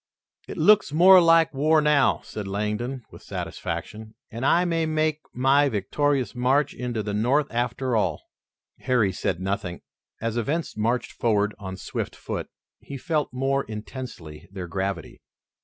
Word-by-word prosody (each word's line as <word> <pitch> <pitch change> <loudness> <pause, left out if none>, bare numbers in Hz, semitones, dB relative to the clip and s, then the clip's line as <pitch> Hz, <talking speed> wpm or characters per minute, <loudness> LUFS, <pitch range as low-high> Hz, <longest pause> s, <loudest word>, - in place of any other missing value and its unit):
"It - - -7
looks 210 -6 +5
more 180 +4 +8
like 165 -2 +4
war 155 +3 +3
now," 150 -2 +3
said 105 -2 -7
Langdon, 105 +6 -3
with - - -13
satisfaction, 110 0 -6 0.2
"and 115 +3 -6
I 170 +6 +4
may 165 -2 0
make 155 -1 0
my 135 +3 +3
victorious 130 +2 0
march 130 +3 +1
into 120 -3 -3
the 105 0 -4
North 125 +8 +2
after 125 +1 -1
all." 110 - 0 0.6
Harry 120 -7 +2
said 90 -1 -2
nothing. 95 -2 -3 0.4
As 115 +1 -2
events 150 +8 -2
marched 115 +3 -1
forward 105 -2 +1
on 95 -2 -6
swift - - -5
foot, - - -5 0.3
he 140 - -8
felt 155 +2 -1
more 135 +2 0
intensely 105 - -8
their 95 -3 -6
gravity. 95 -1 -4
125 Hz, 145 wpm, -25 LUFS, 105-145 Hz, 0.6 s, more